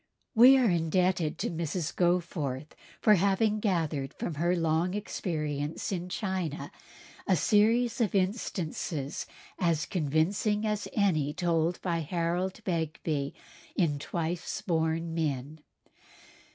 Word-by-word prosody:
We 255 +3 +8
are 255 -3 +4
indebted 175 -2 +1
to - - -2
Mrs. 165 0 -3
Goforth 160 -6 0 0.3
for 215 - +6
having 200 +3 +2
gathered 160 - -1
from 170 - -3
her 170 +4 +1
long 165 +2 +1
experience 155 -7 -3
in 180 -1 -3
China 185 -6 -3 0.6
a 190 - +4
series 225 - +3
of 210 -3 +1
instances 180 - -2 0.3
as 165 -4 +1
convincing 185 +7 0
as 210 -1 -1
any 155 -9 +2
told 170 -1 +1
by 170 -2 0
Harold 175 +5 -1
Begbie 160 -5 -2 0.4
in 150 -6 +1
"Twice 170 +3 -3
Born 165 -1 0
Men." 150 -2 -2
170 Hz, 110 wpm, -29 LUFS, 155-190 Hz, 0.6 s, We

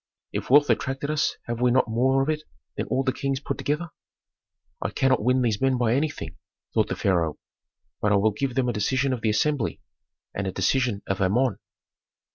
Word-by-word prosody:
If - - -4
wealth 145 +2 +6
attracted 135 +2 -1
us 155 -1 0
have 120 0 -4
we 125 - +4
not 125 +1 +3
more 130 +4 +2
of 140 - -2
it 155 -1 0 0.3
than - - -3
all 135 - 0
the 130 -1 0
kings 135 +1 -2
put 140 - -4
together?" 155 +4 -1 0.9
"I - - -1
cannot 130 -3 +2
win 125 +2 +3
these 110 -2 0
men 135 -1 +2
by 120 -2 +2
anything," 145 +3 -2 0.4
thought - - +2
the - - -3
pharaoh, 85 -5 +1 0.6
"but 105 - +2
I - - +5
will 105 +2 +3
give 125 +4 -3
them 130 -2 +1
a 120 - 0
decision 130 +6 +1
of 120 - -4
the 110 - +1
assembly, 115 +3 0 0.5
and 100 -1 -3
a - - -1
decision 120 0 0
of 95 0 -2
Amon." 105 +3 +2
125 Hz, 200 wpm, -25 LUFS, 110-135 Hz, 0.9 s, wealth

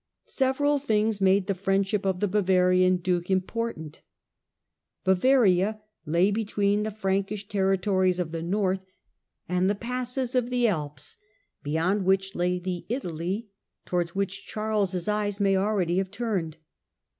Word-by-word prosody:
Several 285 +2 +1
things 215 -5 0
made 195 0 +4
the 200 - 0
riendship 195 +1 0
of 185 -1 -1
the 205 - +2
Bavarian 185 -2 +3
duke 175 0 -1
important. 190 -4 -2 1.0
Bavaria 200 0 +3 0.3
ay 170 +6 +3
between 205 -1 0
the 215 - -1
Frankish 200 0 -2
territories 190 -2 +1
of 175 -3 -2
the 165 0 -4
north 190 +1 0 0.6
and 180 +1 +1
he 205 - +1
passes 250 +3 -3
of 250 -1 +1
the 245 -1 +2
Alps, 150 - -4 0.4
beyond 165 +7 0
which 195 +1 +1
lay 180 +1 0
the 180 -1 -4
Italy 195 - -3 0.4
to - - -15
wards 175 0 -1
which 200 0 -3
Charles' 205 -5 -1
eyes 210 -1 -1
may 195 -1 +3
already 190 -3 +1
have 190 -1 -2
turned. 190 -9 -3
195 Hz, 135 wpm, -26 LUFS, 180-210 Hz, 1.0 s, made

